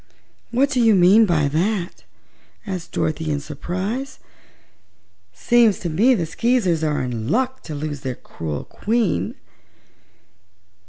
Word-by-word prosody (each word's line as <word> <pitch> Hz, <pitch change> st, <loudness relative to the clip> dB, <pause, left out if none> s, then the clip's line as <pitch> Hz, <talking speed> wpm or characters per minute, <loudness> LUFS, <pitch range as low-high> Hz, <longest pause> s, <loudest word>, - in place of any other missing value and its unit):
"What 270 Hz, +4 st, +1 dB
do 255 Hz, -3 st, +2 dB
you 225 Hz, -3 st, +5 dB
mean 195 Hz, +5 st, +6 dB
by 155 Hz, -5 st, +2 dB
that?" 175 Hz, +4 st, -2 dB, 0.6 s
asked 185 Hz, -5 st, -5 dB
Dorothy 155 Hz, 0 st, -1 dB
in 145 Hz, -1 st, 0 dB
surprise. 185 Hz, -, -4 dB, 1.1 s
"Seems 235 Hz, -4 st, +3 dB
to 175 Hz, -, -2 dB
me 230 Hz, +11 st, +4 dB
the 175 Hz, -6 st, -1 dB
Skeezers 190 Hz, -3 st, +1 dB
are 150 Hz, -3 st, 0 dB
in 115 Hz, -3 st, -4 dB
luck 260 Hz, -, 0 dB
to 155 Hz, -, -6 dB
lose 145 Hz, -1 st, -5 dB
their 130 Hz, -2 st, -4 dB
cruel 75 Hz, -9 st, -6 dB
Queen." 220 Hz, -5 st, -1 dB
180 Hz, 125 wpm, -21 LUFS, 150-230 Hz, 1.1 s, mean